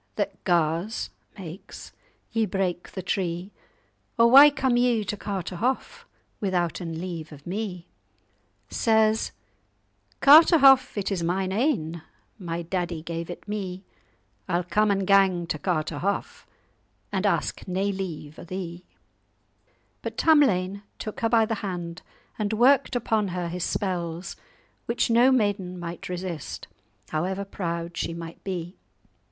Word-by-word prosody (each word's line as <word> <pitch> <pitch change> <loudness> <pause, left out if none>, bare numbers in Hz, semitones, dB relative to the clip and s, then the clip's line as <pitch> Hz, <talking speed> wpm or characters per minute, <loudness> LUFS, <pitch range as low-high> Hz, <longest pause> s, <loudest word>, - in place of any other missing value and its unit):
What - - -3
gars 170 +4 0 0.3
(makes) 185 0 -9 0.4
ye 225 -1 +1
break 180 -2 -2
the 190 - -5
tree? 180 0 -2 0.7
Or 235 0 +5
why 280 +3 +10
come 265 -3 0
ye 240 -3 +3
to 210 - -3
Carterhaugh, 210 - -3 0.4
Withouten 175 -3 -1
leave 170 -3 -6
of 145 -1 -13
me?' 180 -2 -4 0.9
Says—'Carterhaugh 270 +6 +3
it 205 0 -1
is 190 -3 -1
mine 185 +3 0
ain; 190 - 0 0.4
My 170 -2 -4
daddy 175 -2 -3
gave 170 0 -5
it 175 - -8
me: 195 -3 -4 0.7
I'll 175 +1 +1
come 210 +5 +2
and 195 -1 +1
gang 190 -3 +4
to 155 -2 -3
Carterhaugh, 170 +2 -2 0.7
And - - +1
ask - - -1
nae 190 +2 0
leave 165 -6 -6
o' - - -8
thee.'" 175 -1 -6 1.2
But - - -6
Tamlane 200 - +3 0.2
took 215 - -6
her 225 - +1
by 225 -1 +4
the 225 - -2
hand 175 -3 -5 0.4
and 210 0 -1
worked 250 +4 +4
upon 220 -3 +1
her 175 -1 -3
his 180 0 -4
spells, 175 -3 -2 0.5
which 235 0 +1
no 240 +3 +6
maiden 205 -7 0
might 170 0 -6
resist, 180 -4 -5 0.4
however 190 +5 -2
proud 170 -3 -4
she 165 - -3
might 165 0 -9
be. 180 -2 -5
190 Hz, 125 wpm, -26 LUFS, 170-215 Hz, 1.2 s, why